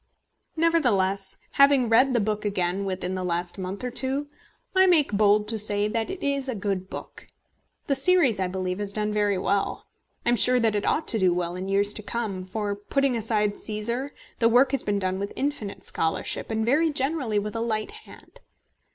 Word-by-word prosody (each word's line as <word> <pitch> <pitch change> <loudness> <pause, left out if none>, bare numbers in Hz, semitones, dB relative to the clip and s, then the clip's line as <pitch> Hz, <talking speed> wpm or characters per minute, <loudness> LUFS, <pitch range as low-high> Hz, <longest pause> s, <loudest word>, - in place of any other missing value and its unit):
Nevertheless, 205 - +1 0.2
having 275 -3 +5
read 255 +3 +4
the - - +4
book 210 0 -1
again 195 -1 -1
within 185 -1 -3
the 185 0 -3
last 175 +1 -3
month 190 +4 -5
or 250 - -3
two, 270 +4 -1 0.5
I 375 0 +6
make 320 - +4
bold 210 0 +3
to 225 -1 0
say 205 0 +1
that 225 +1 -2
it 380 -1 -6
is 280 -1 -1
a 255 - -2
good 195 -2 -3
book. - - -9 0.6
The 280 - +1
series, 275 - +3
I 185 - 0
believe, 185 0 -3
has 205 -1 -3
done 210 0 -1
very 205 -2 +1
well. 200 +2 -1 0.4
I - - +2
am 240 - +3
sure 250 +4 +5
that 225 -3 +1
it 205 - -1
ought 315 - 0
to 225 - +3
do 185 -2 +3
well 175 0 -2
in 185 +1 -5
years 200 +1 +2
to 215 - -3
come, 210 -4 -4
for, 205 +2 -3
putting 270 +5 0
aside 215 -2 0
Cæsar, 235 +6 -3 0.3
the 230 - +4
work 250 +3 +4
has 275 - 0
been 205 -1 -1
done 190 -1 -1
with 200 +1 -4
infinite 270 -8 -4
scholarship, 160 0 -1
and 220 0 -1
very 305 +7 +3
generally 270 -5 -1
with 210 +2 -2
a 225 - -2
light 215 -2 -2
hand. 435 0 -14
215 Hz, 200 wpm, -25 LUFS, 195-260 Hz, 0.6 s, I